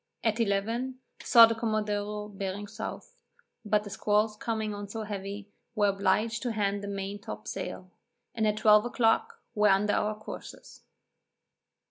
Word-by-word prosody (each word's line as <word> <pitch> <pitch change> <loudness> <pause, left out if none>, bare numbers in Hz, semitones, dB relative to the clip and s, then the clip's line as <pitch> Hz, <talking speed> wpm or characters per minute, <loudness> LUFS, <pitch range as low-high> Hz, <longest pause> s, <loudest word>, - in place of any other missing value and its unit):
At 225 0 +1
eleven, 230 +5 0 0.2
saw 230 -2 +9
the 230 - 0
commodore 210 -2 -2
bearing 200 0 -5
south, 220 - -7 0.5
but 210 -1 +1
the 205 - -9
squalls 210 +1 +1
coming 220 -1 -2
on 205 -1 -7
so 220 +1 -4
heavy, 205 0 -6 0.2
were 205 -2 +3
obliged 200 +3 +1
to 245 -3 -2
hand 200 -1 0
the - - -4
main 200 0 -4
top - - -8
sail, - - -6 0.4
and 220 -2 +1
at 210 0 +1
twelve 210 -1 +6
o'clock, 245 - +1
were 210 -2 +4
under 200 +2 +3
our 210 0 0
courses. 215 - -10
210 Hz, 150 wpm, -29 LUFS, 205-225 Hz, 0.5 s, saw